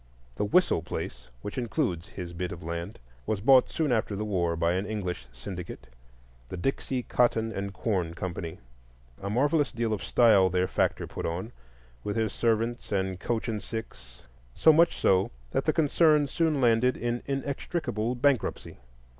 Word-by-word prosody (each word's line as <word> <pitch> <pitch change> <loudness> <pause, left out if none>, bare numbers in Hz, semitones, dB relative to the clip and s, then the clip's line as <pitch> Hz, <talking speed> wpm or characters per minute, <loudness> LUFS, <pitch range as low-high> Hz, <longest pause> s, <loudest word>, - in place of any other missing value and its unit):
The - - 0
Whistle 110 - +3
place, - - -6 0.2
which 105 - -4
includes 115 - -1
his 90 -2 -7
bit 90 +1 -3
of 90 - -8
land, 85 +4 -5 0.3
was 110 - 0
bought 130 +4 +6
soon 155 -5 0
after 110 -3 0
the 105 +2 -3
war 85 -5 0
by 85 +1 +1
an 95 +3 -1
English 90 - -4
syndicate, 85 +6 -8 0.6
the 95 - -6
"Dixie 130 +4 -1
Cotton 115 -2 +1
and 100 -1 -4
Corn 95 -5 -2
Company." 85 -1 -5 0.6
A 100 - -3
marvellous 145 +6 +2
deal 115 -1 -1
of 105 - -3
style 105 -6 +5
their 90 0 +1
factor - - 0
put - - -5
on, 90 +7 -4 0.5
with 105 - -3
his 110 -2 0
servants 115 +1 0
and 95 -2 -1
coach 115 +4 -2
and 110 -3 -2
six; 60 - -8 0.3
so 160 - +6
much 170 +2 +4
so 95 0 +3 0.2
that - - 0
the - - +4
concern 155 -1 +4
soon 155 +1 0
landed 125 0 +3
in 120 0 -2
inextricable 135 - -2
bankruptcy. 130 - 0
110 Hz, 165 wpm, -28 LUFS, 90-125 Hz, 0.6 s, bought